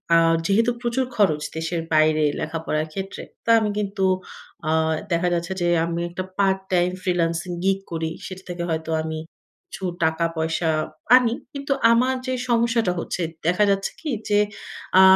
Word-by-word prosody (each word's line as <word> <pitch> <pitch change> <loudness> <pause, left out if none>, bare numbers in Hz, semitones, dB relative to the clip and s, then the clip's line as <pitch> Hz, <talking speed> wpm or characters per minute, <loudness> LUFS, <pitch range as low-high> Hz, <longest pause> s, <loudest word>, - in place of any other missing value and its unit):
আ - - +8 0.3
যেহেতু 225 +5 +3
প্রচুর 240 +2 0
খরচ 160 -8 +3
দেশের 165 +1 -2
বাইরে 155 0 +4 0.2
লেখাপড়ার 155 -1 -2
ক্ষেত্রে, 195 +2 -5 0.2
তো - - -3
আমি 215 -1 0
কিন্তু 200 -1 -2 0.7
আ - - +3 0.4
দেখা 175 +1 +2
যাচ্ছে 175 +2 -1
যে, 175 - +2 0.2
আমি 170 0 -2
একটা 175 +2 -4
পার্ট 195 -1 +3
টাইম 175 0 +3
ফ্রিল্যান্সিং 170 -1 0
গিগ 195 0 +2
করি। 160 -1 -2
সেটা 190 0 -8
থেকে 175 -1 -3
হয়তো 160 0 -2
আমি 160 0 -4 0.5
কিছু 190 - -7 0.2
টাকা-পয়সা 160 0 0 0.5
আনি। 240 -3 +2 0.2
কিন্তু 280 0 -5 0.2
আমার 250 +3 +3
যে, 255 - 0 0.2
সমস্যাটা 230 -4 +2
হচ্ছে, 180 - -3 0.3
দেখা 180 +4 +3
যাচ্ছে 195 0 0
কি? 315 - -4 0.2
যে, 205 0 +4 0.6
আ - - +10
180 Hz, 155 wpm, -23 LUFS, 165-205 Hz, 0.7 s, আ